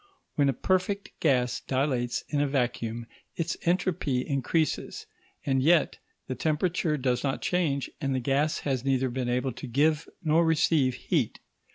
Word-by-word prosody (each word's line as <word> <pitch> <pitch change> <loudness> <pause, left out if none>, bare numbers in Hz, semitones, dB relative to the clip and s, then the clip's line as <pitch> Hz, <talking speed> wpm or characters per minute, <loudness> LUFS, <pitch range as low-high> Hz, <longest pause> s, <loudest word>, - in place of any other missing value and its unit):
When 140 -2 +3
a - - +2
perfect 185 - 0
gas 125 -5 +2
dilates 130 -3 -1
in 145 -1 0
a 145 - +2
vacuum 120 -4 -1 0.3
its 170 +1 -2
entropy 170 -7 +1
increases, 140 +3 -1 0.4
and 135 -2 +2
yet 160 +2 +3 0.3
the 130 - -3
temperature 155 +3 0
does 125 -2 0
not 135 -1 -1
change, 155 -7 0
and 135 -2 0
the - - +1
gas 140 +5 0
has 130 -4 -1
neither 135 -1 +1
been 125 0 -2
able 125 +2 0
to 130 +3 -8
give 150 +5 +1
nor 160 +1 +4
receive 155 -5 +3
heat. - - -1
140 Hz, 155 wpm, -28 LUFS, 130-160 Hz, 0.4 s, nor